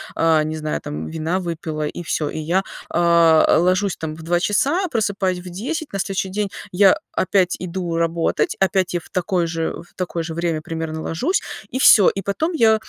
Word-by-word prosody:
а, 160 -1 +3
не 155 +1 -3
знаю, 155 -1 -3
там 75 +2 -5
вина 160 - -2
выпила 160 -3 -4
и 175 - -6
всё. 155 -2 -1
И 155 - -5
я, 175 +5 0 0.3
а, 170 -2 +4
ложусь 185 +2 +1
там 155 -1 -5
в 160 - -11
2 175 +2 +1
часа, 275 - +1
просыпаюсь 200 - -1
в 180 0 -9
10, 270 - -4
на 195 - -3
следующий 190 +1 -2
день 205 +1 -2 0.2
я 195 +1 +5
опять 185 -1 +1
иду 175 -1 -3
работать, 165 0 0
опять 190 -1 +2
я 175 - -1
в - - -18
такое 180 -1 0
же 165 0 -3
э, - - -1
в 175 - -24
такое 175 -2 -3
же 160 0 -5
время 165 -2 -1
примерно 160 -1 -4
ложусь 265 - -1 0.3
и 260 - -3
всё. 205 -7 +7
И 195 - -4
потом 310 - -1
я 225 -8 +5
175 Hz, 200 wpm, -21 LUFS, 165-195 Hz, 0.3 s, всё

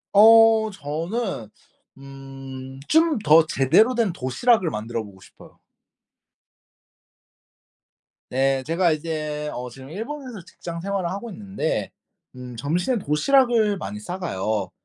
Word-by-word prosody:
어 225 +1 +7
저는 165 - -4 0.5
음 135 -1 -10
좀 320 -3 +3
더 160 +1 +6
제대로 215 - +3
된 220 -7 +1
도시락을 180 - +1
만들어 115 0 -4
보고 100 -2 -14
싶어요. - - -17 2.7
네 135 +1 +1
제가 170 +2 +1
이제 155 -1 -3
어 125 0 -5
지금 130 +2 -12
일본에서 235 - -7
직장 170 -1 -8
생활을 195 -2 -2
하고 200 +5 -5
있는데 195 -4 -3 0.4
음 125 -1 -9
점심에 175 - -1
도시락을 215 - +2
많이 105 - -6
싸가요. 110 - -3
165 Hz, 230 characters per minute, -23 LUFS, 135-215 Hz, 2.7 s, 어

